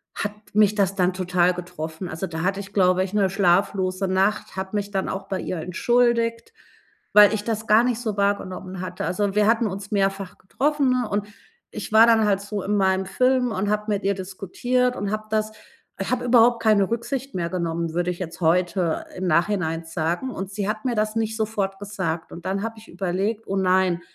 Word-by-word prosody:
hat 205 - -2 0.2
mich 210 0 +4
das 195 -2 +1
dann 185 -1 +2
total 180 -1 +1
getroffen. 170 -1 -6
Also, 165 +2 -4
da 160 -3 -5
hatte 195 +2 0
ich, 200 - -11
glaube 185 -2 +3
ich, 190 +1 -6
'ne 200 -3 +2
schlaflose 190 0 +1
Nacht, 190 +3 0
habe 190 +2 -4
mich 205 0 -3
dann 190 -1 -1
auch 195 0 -5
bei 190 -1 -3
ihr 180 - -4
entschuldigt, 230 - +1 0.6
weil 210 0 +8
ich 210 -1 -2
das 220 -1 -3
gar 215 +2 +6
nicht 245 -2 0
so 220 -4 -3
wahrgenommen 190 -2 -2
hatte. 185 -1 -5
Also, 200 +2 -1
wir 210 - +4
hatten 230 +1 +3
uns 200 +1 -6
mehrfach 195 -2 -1
getroffen, 280 +7 0
ne, 250 -3 0
und 205 0 -1 0.4
ich - - -7
war 225 +1 +7
dann 225 -1 +5
halt 200 -2 +2
so 200 -1 -4
in 205 +1 0
meinem 190 -1 +2
Film 255 +2 +2
und 205 0 -1
habe 210 0 0
mit 205 0 -1
ihr 200 - +3
diskutiert 200 +7 -1
und 200 -2 -3
habe 215 0 -3
das 215 0 0 0.6
habe 250 0 -1
überhaupt 240 -1 +5
keine 210 -3 +3
Rücksicht 250 +2 -3
mehr 170 -1 -1
genommen, 170 -2 -2
würde 175 +1 0
ich 175 - -8
jetzt 170 -1 -7
heute 175 0 +1
im 185 0 -3
Nachhinein 170 -1 +1
sagen. 170 +9 -2
Und 190 -2 -6
sie 200 0 -3
hat 215 0 -3
mir 245 - +1
das 215 0 0
nicht 220 0 -1
sofort 200 -3 -2
gesagt 185 -5 -4
und 170 - -10
dann 195 +1 -1
habe 225 0 -4
ich 220 - -17
überlegt: 195 +5 -2
„Oh 195 - -2
nein, 185 -2 +2
195 Hz, 205 wpm, -23 LUFS, 185-215 Hz, 0.6 s, weil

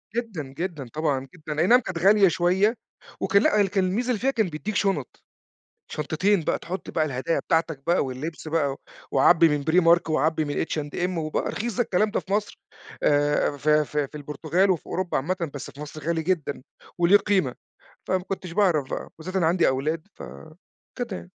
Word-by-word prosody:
جدًا، 225 -10 -3
جدًا، 165 -7 -4
طبعًا 145 -4 -1
جدًا، 155 -2 -5
أي 175 - +3
نعم 245 +1 +7
كانت 190 -7 -5
غالية 195 +3 +5
شوية، 185 +6 +2 0.5
وكان 200 0 +3
لأ، 205 -2 +3
كان 190 0 0
الميزة 225 +7 -1
اللي 235 - +1
فيها 270 +4 +1
كان 220 -6 +1
بيديك 190 +8 -5
شُنط، 195 0 -1 0.7
شنطتين 165 +6 +1
بقى - - 0
تحُطّ 185 +3 -6
بقى 155 -2 +1
الهدايا 145 +3 -1
بتاعتك 160 -4 -1
بقى 175 -3 +3
واللِّبس 150 +6 -6
بقى، 150 -4 0 0.4
وعبي 165 +4 +5
من 145 -1 0
Primark 170 +1 +4
وعبي 155 +1 +1
من 145 +2 -1
H&M 170 +4 -3
وبقى 155 -1 -2
رخيص 230 -1 -3
ده 245 - +3
الكلام 210 0 +1
ده - - 0
في 195 - -11
مصر، 205 0 -2 0.4
آآ 145 0 +2
في 150 +1 +3
في 150 -1 -2
في 150 - -15
البرتغال 155 +6 0
وفي 170 - -2
أوروبا 185 -1 -2
عامةً، 170 +2 -2
بس 140 - -7
في 140 - -16
مصر 150 +1 -8
غالي 165 -1 +1
جدًا، 155 -7 -1 0.3
وله 175 +3 +6
قيمة، 195 -10 0 0.5
فما 185 -1 0
كنتش 185 -2 -5
باعرف 170 -8 +2
بقى، - - -3
وبالذات 185 +4 -8
أنا 170 -4 +3
عندي 175 0 +3
أولاد 155 +7 -1
ف - - -10 0.7
كده 245 -1 -2
يعني. - - -10
165 Hz, 185 wpm, -25 LUFS, 150-190 Hz, 0.7 s, نعم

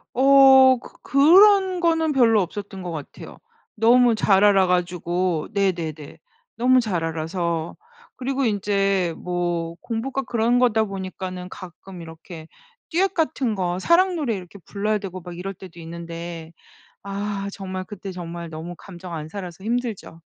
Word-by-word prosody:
어 265 0 +7
그 - - -14
그런 375 +6 +5
거는 325 -2 +1
별로 230 -6 +4
없었던 195 +1 -6
것 175 - -5
같아요. 155 -3 -9 0.4
너무 235 +1 +4
잘 200 -2 +3
알아가지고. 180 -3 +1
네네네. 170 -7 -2 0.4
너무 255 +2 +4
잘 195 -8 -1
알아서. 165 +1 -3 0.4
그리고 270 +1 -2
인제 195 -4 0
뭐 175 -2 -3
공부가 255 +4 -3
그런 240 0 +1
거다 225 -3 +3
보니까는 185 -2 -6
가끔 185 -1 -11
이렇게 160 0 -11 0.4
듀엣 380 +4 +1
같은 270 -8 0
거 180 -2 -2
사랑 360 - +3
노래 275 -10 -1
이렇게 185 +1 -10
불러야 210 +1 -1
되고 185 -2 -7
막 175 0 -9
이럴 195 +2 -5
때도 180 -2 -13
있는데 170 0 -8 0.5
아 200 0 -4
정말 185 -1 -5
그때 195 -1 -8
정말 170 -1 -7
너무 165 +2 -7
감정 180 -1 -11
안 155 -1 -6
살아서 185 -1 -8
힘들죠. 225 -7 -4
195 Hz, 285 characters per minute, -23 LUFS, 175-240 Hz, 0.5 s, 어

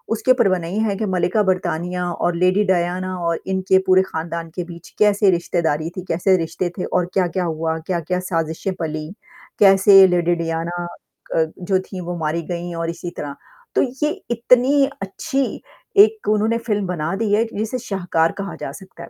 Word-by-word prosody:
उसके 255 +3 +3
परवाह 195 -8 +2
नही 175 +5 -3
हैं 205 -3 -1
कि 215 - -1
मल्लिका 185 +2 +1
ब्रिटेनिया 180 -1 -1
और 175 0 -1
लेडी 185 +4 +3
डायना 185 0 0
और 170 0 0
इनके 190 0 +3
पूरे 185 0 +6
खानदान 165 +1 -5
के 180 - -2
बीच 170 0 -11
कैसे 205 -1 +4
रिश्तेदारी 170 -2 0
थी - - -2
कैसे 185 +3 +3
रिश्ते 170 +1 -2
थे 185 - -2
और 180 -1 0
क्या-क्या 185 -1 0
हुआ 160 0 -2
क्या-क्या 180 0 -1
साजिशें 165 +1 -2
पली, 155 -2 -3 0.5
कैसे 195 -1 +8
लेडी 175 -1 +2
डायना 170 +1 -3 0.5
अ, 160 - +4 0.2
जो 185 +1 +1
थीं 190 0 -7
वो 175 0 -4
मारी 160 +1 -1
गईं 175 0 -4
और 165 0 -2
इसी 170 +1 -5
तरह, 145 -1 -5 0.4
तो - - +4 0.2
ये 300 - +1 0.2
इतनी 250 +4 +4 0.2
अच्छी 270 +8 -2 0.6
एक 435 0 -8
उन्होंने 215 +2 +2
फ़िल्म 205 -3 0
बना 170 0 -2
दी 205 0 0
है 215 +2 +4
जिसे 220 +4 -2
शाहकार 175 -4 +1
कहा 200 0 -4
जा - - -4
सकता 190 -1 -12
है। - - -11
180 Hz, 175 wpm, -20 LUFS, 170-200 Hz, 0.6 s, कैसे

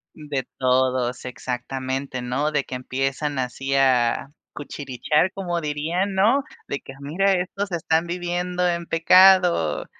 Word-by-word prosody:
De 145 -4 -4
todos, 130 -1 +1
exactamente, 130 +1 -4
¿no? 140 +5 -1
De 150 -2 0
que 130 - -10
empiezan 135 +3 -2
así, 135 +2 -2
a 130 -1 +2 0.2
cuchichear 145 +4 -1
como 175 -3 -3
dirían, 165 +6 -2
¿no? 230 +9 +3 0.2
De 140 - -3
que: 135 - -11
"Mira, 185 +8 +1
estos 190 +2 -2
están 165 0 0
viviendo 180 +1 -1
en 170 -1 -2
pecado, 175 - +5
150 Hz, 125 wpm, -23 LUFS, 130-180 Hz, 0.2 s, pecado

